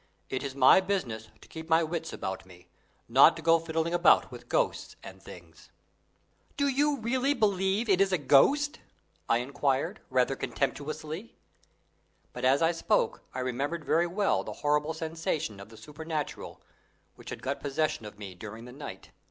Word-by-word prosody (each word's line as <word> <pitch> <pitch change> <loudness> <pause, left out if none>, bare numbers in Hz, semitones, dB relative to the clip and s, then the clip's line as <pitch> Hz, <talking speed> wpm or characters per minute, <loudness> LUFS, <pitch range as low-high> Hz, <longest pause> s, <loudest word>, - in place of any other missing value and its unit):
"It 130 - -1
is 140 -2 -5
my 135 +6 +7
business 125 - -3
to - - -15
keep 160 0 -9
my 165 +1 +4
wits 165 0 -3
about 95 0 -5
me 90 -1 -17 0.4
not - - +7
to 165 - -9
go 165 +1 +5
fiddling 165 +1 -2
about 175 0 +4
with - - -11
ghosts - - 0
and - - -11
things." - - -14 0.9
"Do 285 -1 +2
you 285 +2 +2
really 260 +4 0
believe 200 +1 +1
it 195 -2 +3
is 195 0 +3
a 185 - +3
ghost?" 270 - +4 0.5
I 115 - +4
enquired, 140 - -1
rather 130 0 +2
contemptuously. 155 - -4 1.0
But 125 - -7
as 135 +5 +4
I 165 - +4
spoke 165 - 0
I 130 - -2
remembered 140 +6 -3
very 170 +2 +2
well 200 +3 +1
the - - -6
horrible 150 +2 +1
sensation 160 -8 -3
of 100 - -11
the 110 - -14
supernatural 155 +2 -6 0.5
which - - -12
had - - -7
got 140 +2 -2
possession 145 -2 -1
of 105 - -12
me 100 -3 -8
during 110 +5 -9
the 125 - -10
night. 140 +3 -9
155 Hz, 170 wpm, -29 LUFS, 130-180 Hz, 1.0 s, my